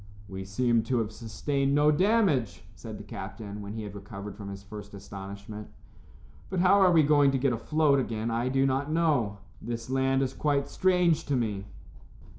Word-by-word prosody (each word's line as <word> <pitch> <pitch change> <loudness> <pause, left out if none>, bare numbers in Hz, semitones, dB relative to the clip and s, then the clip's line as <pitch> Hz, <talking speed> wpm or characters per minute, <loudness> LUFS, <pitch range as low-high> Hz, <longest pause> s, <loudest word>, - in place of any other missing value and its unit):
"We 95 -1 -6
seem 115 +4 +2
to 125 +1 0
have 110 -2 -1
sustained 135 +6 -1
no 150 +1 +5
damage," 170 - +2
said - - -8
the - - -9
captain, 105 -2 -7
when 100 0 -6
he 110 -1 -5
had 105 -2 -7
recovered 100 0 -8
from 100 -2 -8
his 100 0 -8
first 105 0 -9
astonishment, 100 +2 -8 0.8
"but 185 - -2
how 190 +1 +6
we 165 -2 +5
are - - +1
going 145 -2 +5
to 135 - +1
get 130 -1 +1
afloat 145 +4 +2
again 115 -2 -2
I 120 +2 0
do 135 +1 +2
not 135 +2 0
know. 145 -11 +1 0.2
This 115 +2 -5
land 135 0 +2
is 130 0 -2
quite 145 -2 0
strange 180 -4 +2
to 145 - +1
me." 105 -5 -1
125 Hz, 185 wpm, -28 LUFS, 105-145 Hz, 0.8 s, how